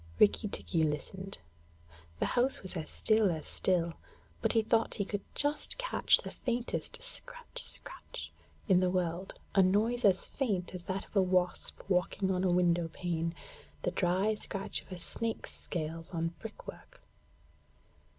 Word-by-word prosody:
Rikki 210 Hz, 0 st, +5 dB
tikki 170 Hz, -4 st, 0 dB
listened. 175 Hz, +6 st, -2 dB, 0.8 s
The -, -, +1 dB
house 250 Hz, 0 st, +2 dB
was 190 Hz, -, -7 dB
as 160 Hz, -3 st, -4 dB
still 215 Hz, -2 st, +4 dB
as 160 Hz, -3 st, -2 dB
still, 170 Hz, -3 st, +1 dB, 0.5 s
but -, -, +2 dB
he 225 Hz, -2 st, +4 dB
thought 225 Hz, +1 st, +2 dB
he 200 Hz, -, 0 dB
could 205 Hz, 0 st, -2 dB
just 295 Hz, +8 st, +1 dB
catch -, -, +4 dB
the -, -, -7 dB
faintest 240 Hz, -1 st, -2 dB
scratch -, -, -5 dB
scratch -, -, -5 dB, 0.4 s
in 185 Hz, -4 st, +6 dB
the 185 Hz, 0 st, +3 dB
world, 180 Hz, 0 st, -1 dB, 0.2 s
a 195 Hz, -, +6 dB
noise 215 Hz, +6 st, +3 dB
as 190 Hz, -3 st, +5 dB
faint 200 Hz, -11 st, -1 dB
as 180 Hz, -1 st, -7 dB
that 195 Hz, 0 st, -2 dB
of -, -, -22 dB
a 195 Hz, -, +6 dB
wasp 180 Hz, -1 st, 0 dB
walking 190 Hz, +1 st, +1 dB
on 185 Hz, 0 st, +1 dB
a 185 Hz, -, +3 dB
window 175 Hz, -1 st, +3 dB
pane, 165 Hz, 0 st, -2 dB, 0.5 s
the -, -, +1 dB
dry 190 Hz, +4 st, +2 dB
scratch 195 Hz, -2 st, -3 dB
of -, -, -20 dB
a 185 Hz, -, -4 dB
snake's 225 Hz, +6 st, -3 dB
scales 165 Hz, 0 st, -4 dB
on 165 Hz, -1 st, -1 dB
brickwork. 225 Hz, -, -10 dB
190 Hz, 155 wpm, -32 LUFS, 175-220 Hz, 0.8 s, in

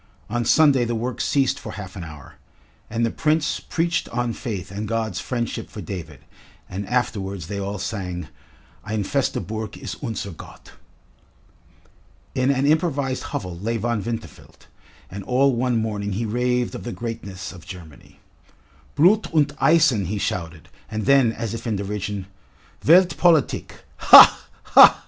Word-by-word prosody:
On 120 Hz, +1 st, 0 dB
Sunday 140 Hz, +1 st, +4 dB
the 120 Hz, 0 st, -2 dB
work 120 Hz, +2 st, -3 dB
ceased 135 Hz, -2 st, +1 dB
for -, -, -8 dB
half 95 Hz, -3 st, -8 dB
an 90 Hz, -, -6 dB
hour, 75 Hz, -4 st, -12 dB, 0.5 s
and 115 Hz, +1 st, 0 dB
the 115 Hz, -, -1 dB
Prince 155 Hz, 0 st, 0 dB
preached 170 Hz, 0 st, -1 dB
on 120 Hz, 0 st, -2 dB
faith 100 Hz, -9 st, -5 dB
and 105 Hz, +2 st, -4 dB
God's 110 Hz, -4 st, -2 dB
friendship 120 Hz, -1 st, -4 dB
for -, -, -9 dB
David, 80 Hz, -8 st, -7 dB, 0.5 s
and 95 Hz, +2 st, -6 dB
afterwards 100 Hz, -7 st, -2 dB
they 100 Hz, +4 st, -5 dB
all 100 Hz, +1 st, -4 dB
sang: 90 Hz, -5 st, -4 dB, 0.6 s
"Ein 105 Hz, 0 st, -2 dB
feste 140 Hz, +6 st, -1 dB
Burg 110 Hz, -1 st, -5 dB
ist 105 Hz, -, -7 dB
unser 110 Hz, -5 st, -4 dB
Gott." 80 Hz, -, -13 dB, 1.6 s
In 130 Hz, +1 st, +1 dB
an 140 Hz, 0 st, +2 dB
improvised 145 Hz, -4 st, 0 dB
hovel 90 Hz, -3 st, -4 dB
lay 115 Hz, +4 st, -2 dB
Von 120 Hz, -1 st, -1 dB
Winterfeld, 115 Hz, +2 st, -8 dB, 0.5 s
and 100 Hz, +2 st, -6 dB
all 130 Hz, +2 st, +3 dB
one 125 Hz, 0 st, 0 dB
morning 105 Hz, -2 st, -2 dB
he 115 Hz, +4 st, -2 dB
raved 125 Hz, +2 st, 0 dB
of -, -, -7 dB
the 120 Hz, -, -5 dB
greatness 110 Hz, -6 st, -6 dB
of 90 Hz, -3 st, -12 dB
Germany. 85 Hz, -6 st, -12 dB, 0.8 s
"Blut 190 Hz, +9 st, +4 dB
und 145 Hz, -2 st, +3 dB
Eisen!" 155 Hz, -, +4 dB
he 100 Hz, +5 st, -3 dB
shouted, 85 Hz, -4 st, -4 dB, 0.2 s
and 110 Hz, -1 st, -4 dB
then, 135 Hz, -4 st, +5 dB
as 115 Hz, -1 st, -5 dB
if 115 Hz, +1 st, -6 dB
in 110 Hz, -, 0 dB
derision, 100 Hz, 0 st, -4 dB, 0.6 s
"Welt 180 Hz, +3 st, +6 dB
Politik 165 Hz, -6 st, +1 dB
ha, -, -, +9 dB, 0.2 s
ha!" -, -, +8 dB
115 Hz, 155 wpm, -22 LUFS, 100-130 Hz, 1.6 s, ha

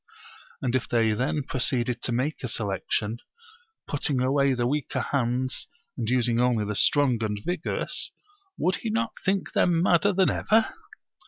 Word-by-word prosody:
And 125 Hz, -2 st, 0 dB
if 130 Hz, -, -1 dB
they 115 Hz, -2 st, +2 dB
then 130 Hz, +6 st, -1 dB
proceeded 125 Hz, -2 st, 0 dB
to -, -, -2 dB
make 130 Hz, +6 st, -1 dB
a -, -, -1 dB
selection, 105 Hz, +1 st, -1 dB, 0.7 s
putting 145 Hz, -2 st, -1 dB
away 135 Hz, +1 st, +2 dB
the 120 Hz, -1 st, 0 dB
weaker 145 Hz, +2 st, -1 dB
hands, 130 Hz, -1 st, -1 dB, 0.3 s
and -, -, -3 dB
using 120 Hz, -2 st, +2 dB
only 120 Hz, -4 st, +2 dB
the 105 Hz, -, -2 dB
strong 125 Hz, 0 st, +2 dB
and 105 Hz, -1 st, -2 dB
vigorous, 175 Hz, -2 st, -1 dB, 0.5 s
would 180 Hz, 0 st, +1 dB
he 230 Hz, -, -4 dB
not 225 Hz, +1 st, 0 dB
think 195 Hz, 0 st, 0 dB
them 170 Hz, -2 st, +3 dB
madder 180 Hz, +2 st, +4 dB
than 190 Hz, -1 st, +3 dB
ever? 220 Hz, +1 st, +2 dB
130 Hz, 155 wpm, -26 LUFS, 120-155 Hz, 0.7 s, madder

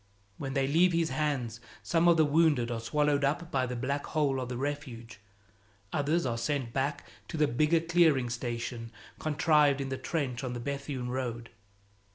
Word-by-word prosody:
When 135 Hz, -1 st, -4 dB
they 135 Hz, -1 st, +2 dB
leave 170 Hz, +6 st, +3 dB
his 165 Hz, -1 st, +1 dB
hands, 130 Hz, -7 st, -1 dB, 0.2 s
some 170 Hz, 0 st, +2 dB
of 170 Hz, -1 st, +6 dB
the 160 Hz, -, +5 dB
wounded 145 Hz, -5 st, +3 dB
are 115 Hz, -, -2 dB
swallowed 145 Hz, +4 st, +1 dB
up 160 Hz, +5 st, -1 dB
by 130 Hz, -2 st, +1 dB
the 125 Hz, -, -4 dB
black 140 Hz, +4 st, -2 dB
hole 140 Hz, -4 st, 0 dB
of 125 Hz, -, -5 dB
the 125 Hz, -, -4 dB
Refuge; 130 Hz, -6 st, -5 dB, 0.7 s
others 155 Hz, +3 st, +1 dB
are 115 Hz, -2 st, -1 dB
sent 125 Hz, -1 st, -2 dB
back 145 Hz, +2 st, -1 dB, 0.2 s
to -, -, -5 dB
the 150 Hz, -1 st, +3 dB
bigger 155 Hz, +7 st, +2 dB
clearing 160 Hz, -7 st, +3 dB
station 115 Hz, -1 st, -4 dB, 0.3 s
contrived 150 Hz, -1 st, +3 dB
in 135 Hz, -1 st, -3 dB
the 130 Hz, 0 st, -3 dB
trench 130 Hz, -3 st, -2 dB
on 125 Hz, -1 st, -3 dB
the 120 Hz, -, -4 dB
Bethune 135 Hz, -1 st, -4 dB
road. 120 Hz, -2 st, -4 dB
140 Hz, 180 wpm, -30 LUFS, 125-150 Hz, 0.7 s, of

